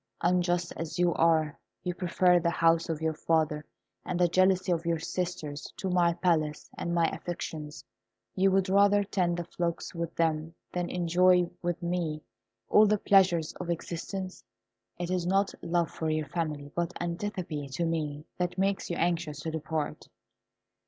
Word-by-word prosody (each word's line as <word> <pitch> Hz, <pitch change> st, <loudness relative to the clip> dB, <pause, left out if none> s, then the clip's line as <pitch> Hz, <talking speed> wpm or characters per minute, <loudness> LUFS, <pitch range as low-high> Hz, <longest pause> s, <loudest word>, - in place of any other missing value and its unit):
Unjust 175 Hz, 0 st, +1 dB
as 165 Hz, +1 st, -4 dB
you 175 Hz, -1 st, +3 dB
are, 160 Hz, -2 st, +2 dB, 0.2 s
you 180 Hz, -, -1 dB
prefer 180 Hz, 0 st, +3 dB
the 170 Hz, -, +1 dB
house 165 Hz, 0 st, +3 dB
of 160 Hz, -1 st, -2 dB
your 160 Hz, 0 st, +1 dB
father 155 Hz, -1 st, +1 dB, 0.4 s
and 180 Hz, -, -3 dB
the 175 Hz, -, +5 dB
jealousy 185 Hz, +1 st, +3 dB
of 170 Hz, -1 st, +1 dB
your 170 Hz, -1 st, +1 dB
sisters 165 Hz, -3 st, -4 dB
to 190 Hz, -2 st, -2 dB
my 175 Hz, -1 st, +4 dB
palace 165 Hz, -4 st, 0 dB
and 170 Hz, -, -3 dB
my 170 Hz, -1 st, +4 dB
affections. 160 Hz, -3 st, -6 dB, 0.5 s
You 195 Hz, +1 st, +3 dB
would 190 Hz, 0 st, +2 dB
rather 200 Hz, +1 st, +5 dB
tend 180 Hz, -3 st, 0 dB
the 175 Hz, -, -2 dB
flocks 170 Hz, 0 st, -3 dB
with 170 Hz, -1 st, -4 dB
them 160 Hz, 0 st, 0 dB, 0.2 s
than 175 Hz, -1 st, -2 dB
enjoy 180 Hz, 0 st, +3 dB
with 175 Hz, 0 st, -2 dB
me 170 Hz, -3 st, -2 dB, 0.4 s
all 215 Hz, 0 st, +6 dB
the 210 Hz, +1 st, +3 dB
pleasures 185 Hz, -6 st, +3 dB
of 180 Hz, -, -5 dB
existence. 180 Hz, +3 st, -4 dB, 0.5 s
It 175 Hz, 0 st, -3 dB
is 180 Hz, -2 st, 0 dB
not 195 Hz, +2 st, +2 dB
love 170 Hz, 0 st, 0 dB
for 160 Hz, -, -3 dB
your 155 Hz, -1 st, -1 dB
family, 150 Hz, -4 st, -3 dB
but 175 Hz, +1 st, -2 dB
antipathy 175 Hz, -4 st, -3 dB
to 135 Hz, +6 st, -2 dB
me, 155 Hz, -2 st, -2 dB
that 180 Hz, +1 st, -1 dB
makes 195 Hz, +1 st, 0 dB
you 170 Hz, -, -1 dB
anxious 165 Hz, -4 st, -1 dB
to 160 Hz, -, -3 dB
depart." 155 Hz, -1 st, -3 dB
170 Hz, 165 wpm, -29 LUFS, 160-180 Hz, 0.5 s, all